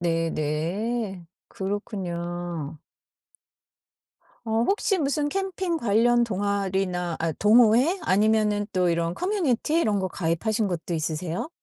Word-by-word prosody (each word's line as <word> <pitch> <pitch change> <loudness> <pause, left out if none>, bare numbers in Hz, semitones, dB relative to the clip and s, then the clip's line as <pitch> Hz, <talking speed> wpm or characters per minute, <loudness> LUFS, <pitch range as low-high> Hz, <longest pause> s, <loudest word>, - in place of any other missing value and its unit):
네네. 170 +5 -1 0.2
그렇군요. 175 -6 -4 1.7
어 225 +1 +1
혹시 395 - +1
무슨 290 0 0
캠핑 375 -3 -2
관련 235 +2 +3
동아리나 190 -4 -1
아 165 0 -1
동호회 235 - +4
아니면은 210 +1 +2
또 180 -1 +2
이런 170 0 0
커뮤니티 330 - 0
이런 210 -8 +1
거 190 - 0
가입하신 200 +6 -1
것도 175 -1 -4
있으세요? 165 - -2
200 Hz, 245 characters per minute, -25 LUFS, 175-235 Hz, 1.7 s, 동호회